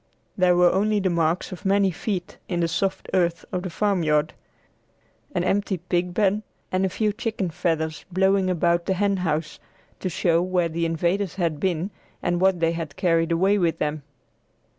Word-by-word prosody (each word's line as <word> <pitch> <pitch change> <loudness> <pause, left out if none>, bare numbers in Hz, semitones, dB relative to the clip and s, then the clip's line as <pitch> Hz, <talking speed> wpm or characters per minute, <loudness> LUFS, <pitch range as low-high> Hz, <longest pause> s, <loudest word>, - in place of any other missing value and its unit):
There 180 -1 +4
were 175 0 +5
only 210 +2 +2
the 190 -2 0
marks 165 +1 0
of 185 -1 -8
many 195 -1 +3
feet 180 0 -4
in 175 -2 -1
the 170 - +2
soft 190 +3 -1
earth 175 -2 +1
of 180 - -2
the 185 - -4
farmyard, 160 -6 +1 1.0
an 175 - +1
empty 195 +1 0
pigpen, 180 +4 0 0.3
and 185 +1 +1
a 190 - +2
few 210 +3 0
chicken 215 -5 -3
feathers 160 -1 -1
blowing 190 +1 +2
about 170 -1 +1
the 190 - +1
hen 200 +1 +1
house, 160 -3 -2 0.4
to 185 - -2
show 170 -1 +2
where 180 -2 +1
the 165 +1 -1
invaders 175 +3 0
had 165 -5 -1
been 180 +2 -1 0.3
and 175 0 0
what 190 -2 +3
they 165 0 +3
had 165 -3 -5
carried 165 -2 +1
away 190 +5 +3
with 170 -3 +1
them. 150 0 -2
180 Hz, 175 wpm, -24 LUFS, 165-190 Hz, 1.0 s, were